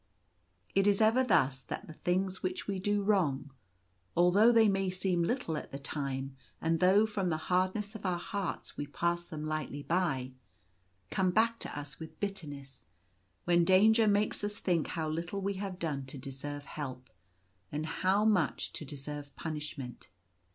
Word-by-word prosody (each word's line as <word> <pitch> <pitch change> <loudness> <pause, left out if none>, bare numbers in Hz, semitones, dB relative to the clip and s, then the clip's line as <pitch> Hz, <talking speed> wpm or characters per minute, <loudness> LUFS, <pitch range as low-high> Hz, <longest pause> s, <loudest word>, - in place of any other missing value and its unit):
It 195 +1 +3
is 200 -1 +4
ever 225 +4 +5
thus 140 - +3
that 120 - -6
the 160 - -10
things 185 +3 -1
which 185 0 -2
we 195 -2 -2
do 205 +1 +1
wrong 150 -9 +1 0.3
— 90 - -24
although 190 +7 +6
they 225 -2 +6
may 195 -1 +1
seem 185 -1 0
little 170 -3 0
at - - -7
the 140 - -4
time, 135 -1 -4 0.2
and 165 0 +1
though 190 +4 +6
from 200 -4 -1
the 160 - +1
hardness 185 +3 +1
of 220 - -8
our 180 -2 +1
hearts 195 +1 -4
we 145 - -4
pass 170 +4 -1
them 155 -1 -5
lightly 155 -2 -3
by 155 -8 0 0.4
— 90 0 -38
come 190 -1 +2
back 230 +4 +2
to - - -5
us 145 0 -9
with 160 -1 -9
bitterness, 145 -10 -6 0.6
when 175 0 +4
danger 215 +5 +5
makes 205 0 +2
us 205 0 -2
think 170 -4 +1
how 160 -2 -2
little 170 +5 -3
we 200 +1 -1
have 195 -2 -4
done 145 -6 -3
to 135 - -7
deserve 140 +2 -6
help, 130 -4 -6 0.6
and 150 +1 -2
how 190 +5 +2
much 185 -9 +1
to - - -5
deserve 145 0 -7
punishment. 150 -5 -6
170 Hz, 170 wpm, -32 LUFS, 145-195 Hz, 0.6 s, although